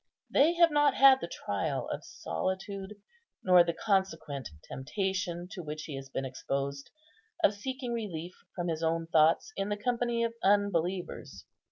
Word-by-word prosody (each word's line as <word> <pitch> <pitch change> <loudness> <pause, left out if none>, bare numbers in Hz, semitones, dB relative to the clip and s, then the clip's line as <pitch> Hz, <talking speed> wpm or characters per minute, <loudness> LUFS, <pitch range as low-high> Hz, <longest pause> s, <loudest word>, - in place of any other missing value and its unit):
They 320 +5 +4
have 340 -1 +5
not 290 -2 +4
had 270 -1 +7
the - - -3
trial - - -3
of - - -4
solitude, 195 +1 -4 0.5
nor 180 -2 +7
the 170 - 0
consequent 160 - -1 0.2
temptation 180 +3 -3
to 190 - -6
which 155 -1 -6
he 150 - -6
has 135 0 -8
been 135 0 -3
exposed, 140 +1 -3 0.5
of 205 - +5
seeking 255 +3 -4
relief 180 -7 -4 0.2
from 175 -1 -2
his 160 -1 -2
own 165 0 0
thoughts 165 - +3
in 195 +1 -2
the 205 - -1
company 240 +1 0
of 230 0 -1
unbelievers. 190 -3 0
190 Hz, 155 wpm, -30 LUFS, 160-225 Hz, 0.5 s, had